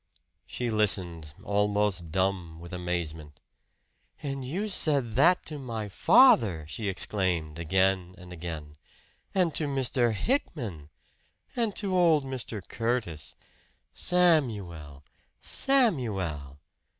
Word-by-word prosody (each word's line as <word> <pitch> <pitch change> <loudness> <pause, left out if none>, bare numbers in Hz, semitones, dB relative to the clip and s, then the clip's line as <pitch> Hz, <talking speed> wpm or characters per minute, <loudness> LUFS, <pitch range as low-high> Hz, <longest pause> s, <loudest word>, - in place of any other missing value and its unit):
She 120 -2 -3
listened, 90 -8 +1
almost 100 -4 0
dumb 95 -3 -1
with 85 +2 -10
amazement. 80 -4 -4 0.8
"And 135 -2 -4
you 180 +12 -3
said 145 - +1
that 165 +10 +3
to 150 -2 -2
my 115 -5 -5
father!" 100 - +5
she 105 +6 -5
exclaimed 90 -5 -1
again 95 +2 +1
and 90 0 -11
again. 80 -3 -7 0.6
"And 180 -4 +2
to 150 - -1
Mr. 130 -3 +2
Hickman! 110 - -3 0.7
And 230 -4 -1
to 195 -3 -1
old 165 -5 +4
Mr. 120 -7 -6
Curtis! 115 -11 -3 0.6
Samuel! 105 - 0 0.4
Samuel!" 105 - 0
105 Hz, 100 wpm, -28 LUFS, 85-135 Hz, 0.8 s, father